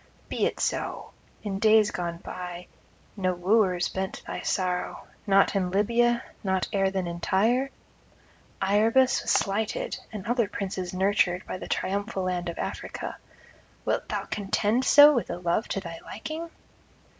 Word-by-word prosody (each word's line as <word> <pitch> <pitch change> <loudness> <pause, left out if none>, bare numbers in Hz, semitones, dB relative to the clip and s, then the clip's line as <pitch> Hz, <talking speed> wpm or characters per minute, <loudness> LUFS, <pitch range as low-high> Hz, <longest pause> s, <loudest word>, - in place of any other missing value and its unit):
Be - - +1
it - - -5
so: - - -2 0.3
in 195 -2 -3
days 215 0 +5
gone 170 -1 -3
by 180 0 -7 0.5
no 185 -3 0
wooers 185 -1 +2
bent 190 0 -4
thy - - -5
sorrow, 180 -1 -2 0.2
not 195 +1 +4
in 185 -2 +1
Libya, 235 +5 +2 0.2
not 190 -2 0
ere 195 -1 +2
then 190 -1 -2
in 170 0 -5
Tyre; 235 +10 +2 0.9
Iarbas 225 +6 +3
was - - -5
slighted, 220 - 0
and 210 -4 -7
other 235 -1 +1
princes 195 -3 -4
nurtured 185 -1 +1
by 185 - -5
the - - -7
triumphal 200 0 -2
land 180 -1 -1
of 170 - -6
Africa; - - -5 0.7
wilt - - -1
thou - - -2
contend 210 +4 0
so 290 +2 +9
with 240 - -1
a 175 - -3
love 175 +5 0
to 195 - -2
thy 170 -3 -7
liking? 320 +8 -6
195 Hz, 150 wpm, -27 LUFS, 185-220 Hz, 0.9 s, so